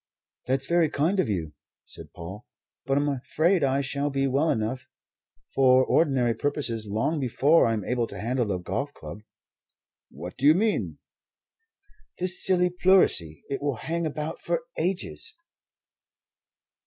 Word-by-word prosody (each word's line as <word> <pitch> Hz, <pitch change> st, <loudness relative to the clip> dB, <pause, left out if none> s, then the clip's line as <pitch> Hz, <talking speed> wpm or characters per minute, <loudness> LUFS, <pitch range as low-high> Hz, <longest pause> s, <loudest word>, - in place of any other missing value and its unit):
"That's 135 Hz, +1 st, 0 dB
very 170 Hz, 0 st, +2 dB
kind 165 Hz, +7 st, 0 dB
of 150 Hz, -, +1 dB
you," 80 Hz, -7 st, -3 dB, 0.3 s
said -, -, -10 dB
Paul, 95 Hz, +7 st, -9 dB, 0.4 s
"but 135 Hz, 0 st, +2 dB
I'm 145 Hz, +1 st, +1 dB
afraid 155 Hz, +6 st, +1 dB
I 135 Hz, 0 st, +2 dB
shall 140 Hz, +1 st, -2 dB
be 135 Hz, -1 st, 0 dB
well 140 Hz, +4 st, +1 dB
enough 115 Hz, +3 st, -2 dB, 0.7 s
for 130 Hz, -1 st, +5 dB
ordinary 135 Hz, -7 st, +2 dB
purposes 115 Hz, -4 st, -2 dB
long 110 Hz, +10 st, -1 dB
before 140 Hz, +5 st, +3 dB
I'm 110 Hz, -4 st, -1 dB
able 120 Hz, -2 st, -1 dB
to -, -, -8 dB
handle 120 Hz, -1 st, -1 dB
a 95 Hz, -, 0 dB
golf 135 Hz, +11 st, -4 dB
club." -, -, -9 dB, 0.9 s
"What 90 Hz, +1 st, -9 dB
do 140 Hz, -, +2 dB
you 155 Hz, -, +7 dB
mean?" 215 Hz, +3 st, 0 dB, 1.2 s
"This 185 Hz, 0 st, +1 dB
silly 180 Hz, -1 st, +3 dB
pleurisy. 180 Hz, -, +3 dB
It 140 Hz, -, -4 dB
will 145 Hz, -2 st, -1 dB
hang 165 Hz, +7 st, -3 dB
about 150 Hz, +1 st, -5 dB
for -, -, -2 dB
ages!" 195 Hz, -, -1 dB
140 Hz, 140 wpm, -26 LUFS, 115-165 Hz, 1.2 s, you